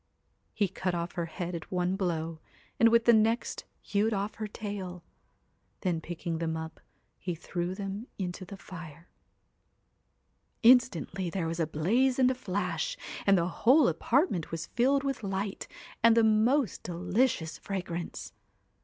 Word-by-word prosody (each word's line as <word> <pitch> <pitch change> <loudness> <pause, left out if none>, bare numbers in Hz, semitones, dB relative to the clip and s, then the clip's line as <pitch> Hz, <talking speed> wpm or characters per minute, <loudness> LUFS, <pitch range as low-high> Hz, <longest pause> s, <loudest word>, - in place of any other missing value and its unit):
He 205 -2 +2
cut 185 0 -2
off 170 +1 -2
her 170 -1 -3
head 175 +1 -5
at 170 - -6
one 180 0 +1
blow, 165 -4 -2 0.4
and 230 - +7
with 230 0 +4
the 235 - +7
next 225 +2 +1 0.2
hewed 210 +2 +1
off 200 +2 -2
her 215 - -1
tail. 195 -4 -6 0.8
Then 175 -4 0
picking 170 -1 -4
them 160 -1 -1
up, 160 0 -7 0.4
he 175 -2 -3
threw 175 +2 -3
them 200 +3 -5
into 180 -1 -4
the 195 +2 -9
fire. 170 -3 -10 1.5
Instantly 225 - +4
there 175 -1 -2
was 165 +1 -3
a 165 - +1
blaze 230 +13 +2
and 255 -1 +5
a - - +1
flash, 185 -8 -2 0.3
and 195 -1 +6
the 170 -1 +1
whole 255 - +4
apartment 190 - +1
was 165 +1 -4
filled 270 +6 +2
with 275 -3 -2
light 195 0 -3 0.3
and 230 0 +6
the 230 - +6
most 220 +4 +3
delicious 180 -1 0
fragrance. 175 -3 -5
190 Hz, 150 wpm, -30 LUFS, 170-225 Hz, 1.5 s, and